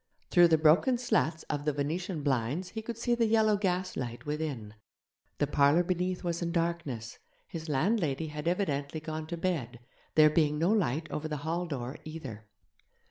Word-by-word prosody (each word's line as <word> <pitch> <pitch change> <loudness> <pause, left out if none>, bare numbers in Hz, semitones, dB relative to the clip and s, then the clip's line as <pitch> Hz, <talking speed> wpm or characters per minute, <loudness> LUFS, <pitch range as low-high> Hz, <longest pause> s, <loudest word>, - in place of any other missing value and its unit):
Through 175 -1 +7
the 160 -1 +4
broken 160 - +4
slats 215 -10 0
of 145 -1 -3
the 150 0 0
Venetian 155 +3 -2
blinds 140 +6 0
he 220 - -5
could 230 +1 -6
see 240 +1 0
the 235 -1 +2
yellow 215 -1 +4
gaslight 180 - -2
within. 145 -8 -3 0.6
The - - +2
parlour 145 +4 +4
beneath 180 +1 -1
was 170 -1 -2
in 170 0 -1
darkness; 165 -9 -2 0.3
his 160 -1 -7
landlady 160 -1 +1
had 150 +1 -5
evidently 155 -5 -1
gone 155 0 -5
to 170 +1 -4
bed, 145 -10 -2 0.4
there 155 -1 +7
being 150 -2 +2
no 170 +6 +2
light 165 - +1
over 155 +1 -3
the 150 -1 -3
hall 170 +2 -1
door 130 -3 -5
either. 135 -10 -8
160 Hz, 170 wpm, -30 LUFS, 145-180 Hz, 0.6 s, Through